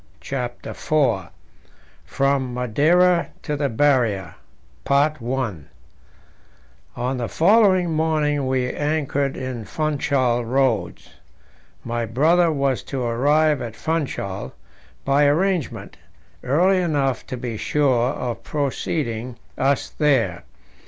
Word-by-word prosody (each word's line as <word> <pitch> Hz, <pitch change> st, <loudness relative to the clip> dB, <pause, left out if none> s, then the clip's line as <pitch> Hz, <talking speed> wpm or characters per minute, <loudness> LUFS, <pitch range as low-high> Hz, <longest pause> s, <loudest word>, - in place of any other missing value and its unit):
CHAPTER 125 Hz, -3 st, -5 dB
IV 130 Hz, -11 st, 0 dB, 0.8 s
From 135 Hz, -2 st, 0 dB
Madeira 165 Hz, +9 st, +3 dB, 0.2 s
to 150 Hz, -, -2 dB
the 140 Hz, -1 st, -1 dB
Barrier 115 Hz, -, +1 dB, 0.6 s
On 135 Hz, -, 0 dB, 1.6 s
the 120 Hz, -2 st, -2 dB
following 185 Hz, -1 st, +4 dB
morning 155 Hz, -3 st, 0 dB
we 130 Hz, -1 st, 0 dB
anchored 145 Hz, -2 st, -1 dB
in 130 Hz, -3 st, -5 dB
Funchal 135 Hz, -4 st, 0 dB
Roads. 120 Hz, -6 st, -1 dB, 0.7 s
My 115 Hz, 0 st, -3 dB
brother 160 Hz, +9 st, +3 dB
was 140 Hz, -3 st, 0 dB
to 135 Hz, -3 st, -4 dB
arrive 145 Hz, +5 st, +2 dB
at 115 Hz, -2 st, -6 dB
Funchal, 135 Hz, -, -3 dB, 0.5 s
by 140 Hz, +2 st, +3 dB
arrangement, 175 Hz, +1 st, -1 dB, 0.5 s
early 180 Hz, +9 st, +3 dB
enough 145 Hz, -6 st, -1 dB
to 130 Hz, -, -5 dB
be 120 Hz, -2 st, -5 dB
sure 130 Hz, 0 st, +1 dB
of 125 Hz, -4 st, -4 dB
preceding 130 Hz, -4 st, -3 dB, 0.2 s
us 135 Hz, +1 st, +1 dB
there. 115 Hz, -, +1 dB
135 Hz, 100 wpm, -22 LUFS, 120-155 Hz, 1.6 s, following